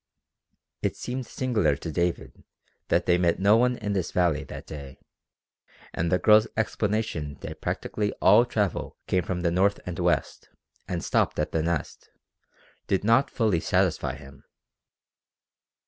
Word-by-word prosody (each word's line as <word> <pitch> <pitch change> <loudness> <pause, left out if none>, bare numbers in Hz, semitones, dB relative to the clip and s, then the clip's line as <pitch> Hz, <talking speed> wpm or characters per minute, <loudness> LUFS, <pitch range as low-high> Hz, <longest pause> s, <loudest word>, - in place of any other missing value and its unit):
It - - -1
seemed 125 0 -5
singular 110 - 0
to 80 +3 -6
David 85 -7 -2 0.4
that - - +2
they 90 0 +3
met 85 -2 +2
no 100 +3 +5
one 125 +1 +2
in 105 -2 -3
the 95 - +1
valley 85 -3 0
that - - -9
day, 70 -3 -9 1.0
and 85 +1 -1
the 90 - +4
girl's 105 +3 +5
explanation 105 -9 -1
that - - -8
practically 105 -1 -2
all 120 - +5
travel 105 -6 -2
came 90 - +1
from 90 0 -3
the 85 -1 +1
north 95 +3 +2
and 90 0 -5
west, 85 -5 -1 0.4
and - - -3
stopped - - +1
at 75 0 -1
the 80 - 0
Nest, 85 -2 -3 0.8
did 95 -1 0
not 115 +6 +3
fully 110 -8 +1
satisfy - - 0
him. 70 0 -14
90 Hz, 145 wpm, -26 LUFS, 80-110 Hz, 1.0 s, no